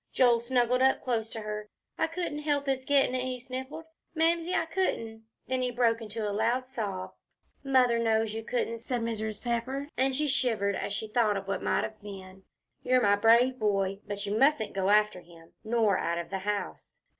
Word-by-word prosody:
Joel 240 Hz, -2 st, +4 dB
snuggled 245 Hz, +1 st, +1 dB
up 265 Hz, 0 st, +3 dB
close 230 Hz, -3 st, -1 dB
to 225 Hz, -, -6 dB
her. 210 Hz, 0 st, -5 dB, 0.3 s
"I -, -, +1 dB
couldn't 330 Hz, -3 st, -4 dB
help 290 Hz, -2 st, 0 dB
his 265 Hz, -1 st, -1 dB
gettin' 275 Hz, -2 st, +3 dB
it," 255 Hz, -, 0 dB
he 255 Hz, -1 st, -3 dB
sniffled, 260 Hz, +5 st, -7 dB, 0.3 s
"Mamsie, 335 Hz, +2 st, +1 dB
I -, -, +1 dB
couldn't." 225 Hz, -11 st, -2 dB, 0.2 s
Then 255 Hz, 0 st, 0 dB
he 250 Hz, -, 0 dB
broke 235 Hz, -2 st, +2 dB
out -, -, -15 dB
into 215 Hz, 0 st, -4 dB
a 205 Hz, -, -2 dB
loud 235 Hz, +5 st, +1 dB
sob. 210 Hz, -8 st, -4 dB, 0.5 s
"Mother 255 Hz, -4 st, +3 dB
knows 225 Hz, -1 st, +1 dB
you 225 Hz, 0 st, -4 dB
couldn't," 230 Hz, 0 st, -2 dB
said 240 Hz, +1 st, -3 dB
Mrs. 220 Hz, -2 st, -3 dB
Pepper, 255 Hz, +4 st, -2 dB
and 265 Hz, +1 st, +1 dB
she 300 Hz, +2 st, 0 dB
shivered 225 Hz, -7 st, +1 dB
as 200 Hz, -, -3 dB
she 210 Hz, +2 st, -3 dB
thought 215 Hz, -2 st, +2 dB
of 195 Hz, 0 st, -6 dB
what 195 Hz, -, -2 dB
might -, -, +1 dB
have 215 Hz, 0 st, -6 dB
been. 190 Hz, -2 st, -10 dB, 0.4 s
"You're 255 Hz, 0 st, +3 dB
my 205 Hz, -4 st, +4 dB
brave 235 Hz, +5 st, +4 dB
boy. 195 Hz, -2 st, 0 dB
But 205 Hz, 0 st, -4 dB
you 205 Hz, +1 st, -2 dB
mustn't 275 Hz, -5 st, +3 dB
go 195 Hz, 0 st, 0 dB
after 210 Hz, -2 st, +3 dB
him, 165 Hz, -1 st, -17 dB
nor 220 Hz, -3 st, +2 dB
out 170 Hz, 0 st, -1 dB
of 170 Hz, +1 st, -5 dB
the 195 Hz, -, -2 dB
house." 205 Hz, +1 st, -5 dB
230 Hz, 200 wpm, -29 LUFS, 210-260 Hz, 0.5 s, Joel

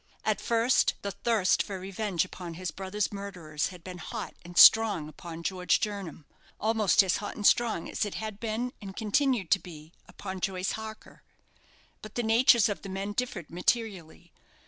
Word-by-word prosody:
At -, -, 0 dB
first, 235 Hz, +2 st, +2 dB
the 200 Hz, -, -2 dB
thirst 210 Hz, -1 st, +2 dB
for 195 Hz, -3 st, -5 dB
revenge 190 Hz, -2 st, -2 dB
upon 175 Hz, -2 st, -8 dB
his 180 Hz, -1 st, -4 dB
brother's 190 Hz, +4 st, -3 dB
murderers 180 Hz, -7 st, -4 dB
had 180 Hz, -3 st, -11 dB
been 180 Hz, -1 st, -8 dB
hot 225 Hz, +3 st, -6 dB
and 175 Hz, 0 st, -11 dB
strong 210 Hz, -9 st, +7 dB
upon 165 Hz, +2 st, -9 dB
George 180 Hz, 0 st, +1 dB
Jernam 195 Hz, -8 st, -5 dB, 0.3 s
almost 215 Hz, -3 st, +3 dB
as 185 Hz, -2 st, +1 dB
hot 205 Hz, -, -6 dB
and 210 Hz, -, -5 dB
strong 230 Hz, -8 st, +3 dB
as -, -, -2 dB
it 205 Hz, -, -4 dB
had 215 Hz, -2 st, -5 dB
been, 230 Hz, +3 st, -3 dB
and 195 Hz, -2 st, -8 dB
continued 225 Hz, -, +1 dB
to 195 Hz, -, +5 dB
be, 160 Hz, -3 st, -12 dB, 0.2 s
upon 190 Hz, -1 st, -7 dB
Joyce 185 Hz, 0 st, -1 dB
Harker; 220 Hz, 0 st, -8 dB, 0.8 s
but 215 Hz, 0 st, -11 dB
the 240 Hz, -, 0 dB
natures 230 Hz, 0 st, +5 dB
of 205 Hz, -, -4 dB
the 195 Hz, -, -8 dB
men 195 Hz, +2 st, -4 dB
differed 205 Hz, -8 st, -4 dB
materially. 180 Hz, -3 st, -2 dB
195 Hz, 170 wpm, -28 LUFS, 180-220 Hz, 0.8 s, strong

